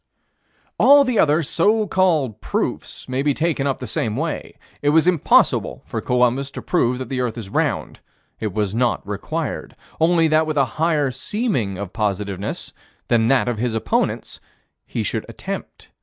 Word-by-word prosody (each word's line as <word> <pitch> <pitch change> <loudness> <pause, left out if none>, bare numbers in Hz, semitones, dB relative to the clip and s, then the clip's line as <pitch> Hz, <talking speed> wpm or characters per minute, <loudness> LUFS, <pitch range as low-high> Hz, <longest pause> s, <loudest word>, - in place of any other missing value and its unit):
All 285 0 +7
the 250 -5 0
other 155 +1 +4
so 210 +9 +2
called 165 - +1
proofs - - -3
may 130 +1 -1
be 145 -1 +1
taken 160 -4 0
up 135 - +1
in - - -27
the - - -3
same 110 -3 -1
way. 160 +2 -4 0.2
It 145 - +2
was 160 +2 +4
impossible 175 -4 +3
for - - -4
Columbus 125 +2 +1
to - - -3
prove 125 -8 +1
that 130 - -5
the 130 -2 -2
earth 120 -2 -2
is 105 -4 -7
round. - - -1 0.4
It 110 -2 -2
was 105 0 -1
not 120 -3 0
required: 130 +8 -4 0.2
only 165 0 +4
that 155 +1 +3
with 155 -1 -2
a 140 - +4 0.2
higher 150 -5 +2
seeming 130 - -2
of 95 -2 -6
positiveness 100 -2 -3 0.4
than 115 -1 +3
that 135 -1 +3
of 120 -3 -1
his 120 -1 -1
opponents, 110 0 -1 0.5
he - - -2
should - - -2
attempt. - - -7
135 Hz, 170 wpm, -21 LUFS, 115-160 Hz, 0.5 s, All